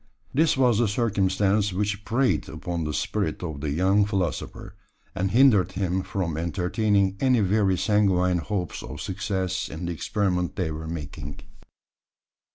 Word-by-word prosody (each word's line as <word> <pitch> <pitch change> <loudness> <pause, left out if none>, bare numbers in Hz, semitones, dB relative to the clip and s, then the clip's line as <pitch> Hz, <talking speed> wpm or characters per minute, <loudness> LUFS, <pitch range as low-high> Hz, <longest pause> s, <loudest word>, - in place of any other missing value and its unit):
This 155 0 +3
was 125 -4 +3
the 120 - +3
circumstance 100 -2 +1
which 100 +2 -2
preyed 115 - +1
upon 85 +2 -4
the 75 - -2
spirit - - -2
of 75 -5 -5
the 75 - -2
young 95 +7 +3
philosopher, 95 -6 -3 0.4
and 95 +2 -1
hindered 115 -3 +4
him 95 -1 -1
from 90 -5 -3
entertaining 95 +3 +1
any 130 -3 +3
very 100 -1 +2
sanguine 90 -2 +2
hopes 90 +3 -3
of - - -8
success 95 -1 -2
in 80 +3 -6
the 85 - -2
experiment 90 +1 -1
they 90 -5 -1
were 80 +1 -6
making. 75 -4 -7
95 Hz, 145 wpm, -25 LUFS, 90-105 Hz, 0.4 s, hindered